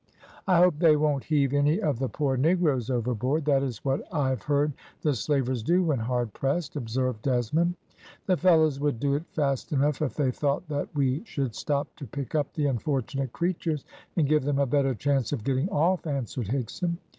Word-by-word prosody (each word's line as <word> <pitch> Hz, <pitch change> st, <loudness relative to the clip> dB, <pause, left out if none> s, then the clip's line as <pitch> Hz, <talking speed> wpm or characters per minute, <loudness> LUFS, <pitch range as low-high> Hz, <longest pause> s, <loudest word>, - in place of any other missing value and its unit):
"I 185 Hz, -2 st, +4 dB
hope 175 Hz, -3 st, +4 dB
they 165 Hz, -3 st, +6 dB
won't 145 Hz, -3 st, 0 dB
heave 145 Hz, -3 st, +2 dB
any 145 Hz, +5 st, +3 dB
of 150 Hz, -, 0 dB
the 130 Hz, -1 st, -1 dB
poor 140 Hz, -3 st, 0 dB
negroes 145 Hz, -4 st, +2 dB
overboard. 125 Hz, +4 st, 0 dB
That 140 Hz, -2 st, +3 dB
is 130 Hz, -5 st, -4 dB
what 135 Hz, +1 st, +1 dB
I 145 Hz, -6 st, +1 dB
have 130 Hz, -, -2 dB
heard 145 Hz, 0 st, +1 dB, 0.3 s
the 150 Hz, -, +2 dB
slavers 130 Hz, 0 st, 0 dB
do 175 Hz, +10 st, +2 dB
when 155 Hz, -7 st, +1 dB
hard 120 Hz, -1 st, -1 dB
pressed," 145 Hz, +3 st, -2 dB
observed 125 Hz, -2 st, -2 dB
Desmond. 140 Hz, +8 st, +1 dB, 0.5 s
"The 185 Hz, -, +3 dB
fellows 160 Hz, -5 st, +4 dB
would 145 Hz, -5 st, 0 dB
do 140 Hz, +2 st, +1 dB
it 150 Hz, +4 st, -2 dB
fast 140 Hz, 0 st, -1 dB
enough 145 Hz, 0 st, +1 dB
if 150 Hz, -, -1 dB
they 140 Hz, -4 st, +1 dB
thought 140 Hz, +3 st, -1 dB
that 145 Hz, -1 st, -2 dB
we 135 Hz, +2 st, +1 dB
should 135 Hz, -, -3 dB
stop 145 Hz, +3 st, -2 dB
to 140 Hz, -, -8 dB
pick 135 Hz, +2 st, -6 dB
up 150 Hz, -3 st, 0 dB
the 150 Hz, -, -1 dB
unfortunate 135 Hz, -1 st, -1 dB
creatures, 170 Hz, -3 st, -2 dB, 0.3 s
and 155 Hz, -4 st, +3 dB
give 150 Hz, 0 st, +3 dB
them 140 Hz, 0 st, 0 dB
a 140 Hz, -, +3 dB
better 135 Hz, 0 st, +1 dB
chance 135 Hz, -1 st, 0 dB
of 135 Hz, -7 st, -2 dB
getting 135 Hz, -, 0 dB
off," 180 Hz, -1 st, +1 dB
answered 130 Hz, -5 st, -3 dB
Higson. 140 Hz, -, -2 dB
140 Hz, 195 wpm, -27 LUFS, 130-155 Hz, 0.5 s, they